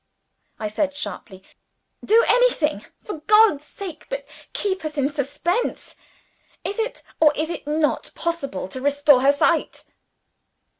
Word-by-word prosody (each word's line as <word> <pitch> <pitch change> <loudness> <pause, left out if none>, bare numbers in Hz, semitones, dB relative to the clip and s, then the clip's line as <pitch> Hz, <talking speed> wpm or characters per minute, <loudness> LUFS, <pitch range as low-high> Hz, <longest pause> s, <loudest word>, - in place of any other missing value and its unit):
I 215 - -3
said 280 +7 -1
sharply. 195 -9 -7 0.6
"Do 455 +2 +5
anything, 325 - +3 0.2
for 410 -7 -6
God's 425 -9 +5
sake, 350 -1 -9
but - - -4 0.3
keep 380 -4 -2
us 310 -1 -5
in 280 +1 +1
suspense. 300 - -2 0.7
Is 400 +3 -4
it, 455 +2 -3 0.2
or 310 -2 +6
is 315 +3 -2
it 330 - -7
not, 300 0 0
possible 275 - -3
to 260 - -7
restore 285 -1 +4
her 275 +2 +6
sight?" 285 - +1
305 Hz, 135 wpm, -22 LUFS, 280-395 Hz, 0.7 s, or